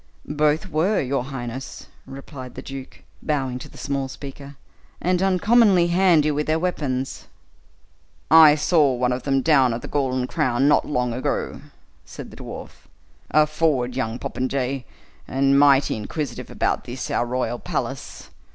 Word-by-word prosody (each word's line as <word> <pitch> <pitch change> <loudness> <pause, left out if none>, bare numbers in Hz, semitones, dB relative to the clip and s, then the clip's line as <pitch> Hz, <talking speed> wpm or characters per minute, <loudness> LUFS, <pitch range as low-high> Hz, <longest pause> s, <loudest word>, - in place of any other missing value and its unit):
"Both 150 +3 +1
were, 180 +5 +1
your 130 -1 -1
highness," 130 -1 -7 0.2
replied 135 -1 -9
the 130 - -8
duke, 135 -1 -9 0.2
bowing 135 -5 -2
to - - -10
the - - -16
small 140 -1 -2
speaker, 140 +1 -10 0.4
"and 180 +1 0
uncommonly 195 -1 +4
handy 170 -4 +4
with 150 +1 -2
their 155 +1 +2
weapons." 140 -7 -3 1.0
"I 160 -2 +9
saw 150 -3 +3
one 125 0 0
of 125 +1 -2
them 135 -1 0
down 135 -7 +4
at 120 - -7
the - - -6
Golden 130 -3 -1
Crown, 130 +1 +1
not 145 - +3
long 125 -4 -1
ago," 125 - -3 0.4
said - - -10
the - - -13
dwarf; - - -10 0.4
"a 155 0 +4
forward 150 -5 0
young 120 -3 -2
popinjay, 130 0 -3 0.4
and 135 +1 +3
mighty 140 -3 +4
inquisitive 140 +8 -5
about - - -1
this, 125 +1 -5
our 120 - 0
royal 125 -1 -2
palace. - - -5
140 Hz, 150 wpm, -23 LUFS, 130-155 Hz, 1.0 s, I